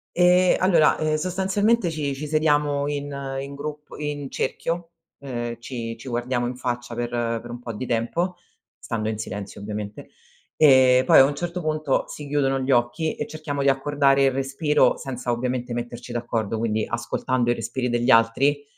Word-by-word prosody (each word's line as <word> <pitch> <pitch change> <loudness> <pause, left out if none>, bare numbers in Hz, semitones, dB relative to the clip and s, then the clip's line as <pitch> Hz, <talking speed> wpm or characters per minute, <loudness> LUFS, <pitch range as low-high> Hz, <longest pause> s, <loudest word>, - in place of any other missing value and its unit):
Ehm, 180 +1 +5
allora, 170 -5 +4
ehm, 155 0 0
sostanzialmente, 190 +4 +1
ci 150 -3 -2
ci 150 +3 -5
sediamo 145 -2 +2
in 145 0 -3 0.3
in 140 +1 -7
grup 150 +1 -7
in 145 -2 -4
cerchio, 165 +5 -3 0.3
ehm, 120 -4 -5
ci 115 -2 -5
ci 120 - -12
guardiamo 120 0 -1
in 125 - -4
faccia 120 -1 -4
per 120 0 -2 0.3
per 120 - -11
un 120 +1 -6
po' 120 -1 -6
di 120 +4 -5
tempo, 145 +11 -1 0.4
stando 110 -1 -3
in 110 - -3
silenzio, 100 -2 -6
ovviamente, 105 0 -6 0.5
ehm, 130 -3 +6
poi, - - +7
a - - +10
un 140 +2 +1
certo 175 +3 -4
puntoc, 155 -3 0
si 150 - -7
chiudono 135 -2 +1
gli 130 +1 -1
occhi 120 +6 +1
e - - -4
cerchiamo 150 -2 -4
di 140 - +4
accordare 140 0 +3
il 135 - +4
respiro, 135 +3 +2
senza 125 -2 -4
ovviamente 125 0 -2
metterci 120 0 -6
d'accordo, 115 -2 -2
quindi 110 -1 0
ascoltando 120 +1 -1
i - - +3
respiri 120 +2 -3
degli 120 +1 0
altri 130 +5 +4
135 Hz, 175 wpm, -24 LUFS, 120-150 Hz, 0.5 s, a